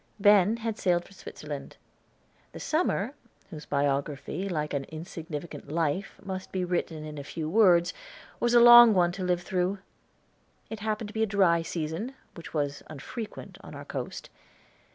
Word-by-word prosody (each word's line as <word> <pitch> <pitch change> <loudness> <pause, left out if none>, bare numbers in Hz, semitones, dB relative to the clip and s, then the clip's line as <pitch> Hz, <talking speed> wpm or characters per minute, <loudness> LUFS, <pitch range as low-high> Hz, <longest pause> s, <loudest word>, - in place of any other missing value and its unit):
Ben 205 +1 +5
had 225 -1 -4
sailed 175 -2 +1
for - - -16
Switzerland. 150 -6 -8 0.8
The - - -8
summer, 285 - 0 0.4
whose 155 -2 -9
biography 145 +6 -1
like 150 -4 -2
an 140 -1 -2
insignificant 155 -2 -7
life 165 +4 -1
must 190 -1 -6
be 185 -1 -1
written 170 -3 -2
in 150 -1 -7
a - - -6
few 155 +2 -5
words, 175 -2 +4 0.5
was 240 0 +2
a - - +9
long 240 -2 +9
one 175 -1 +3
to 185 +1 -5
live 180 -1 0
through. 185 +2 -1 0.9
It 220 - -5
happened 215 0 -3
to - - -11
be 220 - -2
a 220 - +3
dry 190 -5 +3
season, 165 - -4 0.2
which 170 - -10
was 145 -2 -2
unfrequent 180 - -8
on - - -11
our - - -8
coast. - - -6
175 Hz, 160 wpm, -28 LUFS, 155-205 Hz, 0.9 s, a